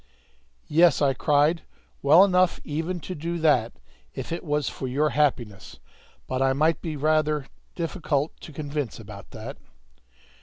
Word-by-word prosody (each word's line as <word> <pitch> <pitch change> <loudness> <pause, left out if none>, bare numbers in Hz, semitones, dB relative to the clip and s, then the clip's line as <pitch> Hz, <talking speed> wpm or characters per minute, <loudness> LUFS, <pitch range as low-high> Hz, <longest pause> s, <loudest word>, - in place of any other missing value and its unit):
"Yes!" 165 +1 +4
I 140 -2 +3
cried; 150 +4 +2 0.4
"well 155 +7 +7
enough 185 -2 +2
even 165 +4 -3
to 185 - -6
do 170 +2 -4
that, 145 -8 +2 0.4
if - - -6
it 170 - -3
was 150 -3 -1
for 130 - -4
your 145 +4 +1
happiness; 120 - -1 0.5
but 130 0 -3
I 135 0 +3
might 155 +4 +1
be 160 -2 -4
rather 155 0 +1 0.3
difficult 165 -4 -1
to - - -10
convince 145 -4 -4
about 105 -3 -11
that." - - -8
150 Hz, 145 wpm, -25 LUFS, 135-165 Hz, 0.5 s, well